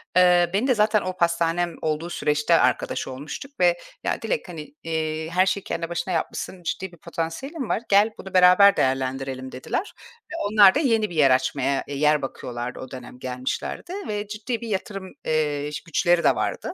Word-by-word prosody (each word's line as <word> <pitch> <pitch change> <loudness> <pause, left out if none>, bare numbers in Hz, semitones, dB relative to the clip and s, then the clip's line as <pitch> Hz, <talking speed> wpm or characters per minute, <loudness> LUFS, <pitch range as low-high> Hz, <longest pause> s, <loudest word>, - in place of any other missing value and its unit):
Eee, 180 -1 +5
beni 210 +7 +1
de 255 - +3
zaten 215 0 +3
o 185 0 -4
pastanem 170 0 +1
olduğu 155 +2 -2
süreçte 150 -1 +1
arkadaş - - 0
olmuştuk 145 - -7
ve, 175 -1 +4 0.3
"Ya - - -1
Dilek, - - -2
hani, 155 -4 -9
eee, 160 -1 -2
her 185 +3 +3
şeyi 195 +1 -1
kendi 165 0 -4
başına 175 +1 -3
yapmışsın, 175 +2 -3
ciddi 190 +2 -3
bir 175 - -16
potansiyelin 205 - -5
var. - - 0
Gel, 205 +2 +5
bunu 190 0 -10
beraber 185 +2 +7
değerlendirelim" 130 0 -1
dediler. 130 - -4 0.4
Ve - - -5
onlar 205 -3 +7
da - - +3
yeni 225 - +2
bir 175 - -8
yer 140 -4 +5
açmaya, 135 +1 +1
eee, 140 - -5
yer 150 +1 +3
bakıyorlardı 125 -2 -5
o 130 - -9
dönem 125 -1 -10
gelmişlerdi. 130 - -4
Ve 210 -1 -3
ciddi 220 +3 -4
bir 235 - -6
yatırım, 195 -2 -4
eee, 150 -2 0
ş 145 - -4
güçleri 175 +1 +2
de - - +4
vardı. - - -3
170 Hz, 185 wpm, -24 LUFS, 145-195 Hz, 0.4 s, beraber